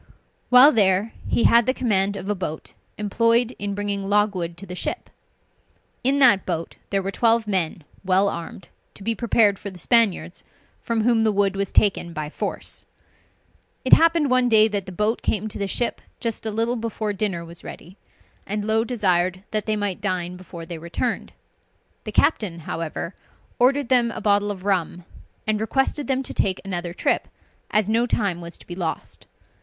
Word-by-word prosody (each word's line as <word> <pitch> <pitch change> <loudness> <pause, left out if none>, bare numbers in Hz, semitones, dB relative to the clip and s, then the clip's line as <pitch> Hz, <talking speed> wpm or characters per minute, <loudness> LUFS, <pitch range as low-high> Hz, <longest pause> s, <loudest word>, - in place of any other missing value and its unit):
While 255 +4 +9
there, 200 -1 +2
he - - +1
had 235 -1 +5
the 255 - +2
command 200 -5 +1
of 195 -1 -6
a 210 - +1
boat 170 -5 -6 0.2
employed 230 +4 +1
in 200 0 -3
bringing 205 -1 -2
logwood 200 -5 +1
to 195 - -9
the 180 - -8
ship. 180 - -4 0.9
In 270 +3 +2
that 240 -9 +5
boat 165 -2 -4
there 195 -1 0
were 195 - -2
twelve 230 +1 +2
men 180 -5 -1 0.2
well 190 +1 +3
armed, 170 0 -6 0.3
to 200 - -9
be 230 +3 +1
prepared 220 -3 +2
for 200 - -6
the 185 - -12
Spaniards, 225 +2 +2 0.4
from 230 -1 -1
whom 235 -1 +3
the 220 -1 +3
wood 200 -1 +1
was 195 0 -2
taken 190 -4 +2
by 155 -1 -5
force. - - -4 1.0
It 255 - +3
happened 330 -4 +5
one 255 -1 +4
day 220 -1 +7
that 200 -2 -3
the - - -6
boat 210 +5 0
came 215 0 -1
to 215 - -6
the 200 - -1
ship 240 +4 -1 0.2
just 225 -1 -3
a - - 0
little 230 +3 0
before 220 -2 -3
dinner 195 -4 -2
was 170 +1 -10
ready, 180 +4 -10 0.5
and 210 +1 -2
Low 220 +1 +2
desired 185 -6 0
that 215 0 -2
they 215 - +1
might 205 -3 -2
dine 180 -3 -2
before 175 -2 -10
they 165 -1 -7
returned. 170 +2 -3 0.7
The - - -4
captain, 185 - +1
however, 165 +3 -5 0.5
ordered 265 +1 +3
them 245 -2 +4
a - - -5
bottle 205 0 +2
of 195 -2 -6
rum, 180 -3 -1 0.4
and 215 -1 0
requested 270 +5 0
them 265 0 0
to - - -4
take 190 -1 0
another 175 -2 -3
trip, 175 - 0 0.4
as 215 -2 +2
no 230 +3 +2
time 200 -7 -1
was 170 0 -8
to - - -15
be 175 - -7
lost. 175 -3 -5
205 Hz, 180 wpm, -23 LUFS, 185-230 Hz, 1.0 s, While